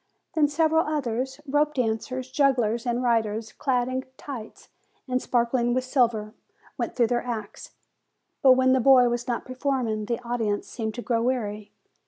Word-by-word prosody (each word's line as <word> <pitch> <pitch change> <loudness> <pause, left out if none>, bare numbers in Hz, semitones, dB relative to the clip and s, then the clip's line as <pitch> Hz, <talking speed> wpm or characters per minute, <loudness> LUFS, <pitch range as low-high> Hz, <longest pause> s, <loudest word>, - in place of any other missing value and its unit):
Then 305 -2 +3
several 320 +2 +2
others, 265 -2 -2
rope 295 +2 +1
dancers, 255 +2 -2
jugglers, 250 -4 +1
and 240 +1 0
riders, 225 -2 0
clad 250 -3 0
in 260 0 -2
tights, 245 -7 -9 0.4
and 255 0 0
sparkling 240 0 +1
with 255 - +1
silver, 235 -5 +1 0.4
went - - -3
through 240 - +4
their 240 +1 0
acts; 225 -4 -6 0.7
but 260 -2 +8
when 260 0 +3
the 260 - +3
boy 250 -1 +6
was 240 +1 -3
not 240 -2 -2
performing, 255 -5 -2
the 235 +1 -2
audience 225 -4 -2
seemed 220 -2 -4
to 240 - -5
grow 230 -2 0
weary. 215 -4 -2
245 Hz, 160 wpm, -25 LUFS, 230-260 Hz, 0.7 s, but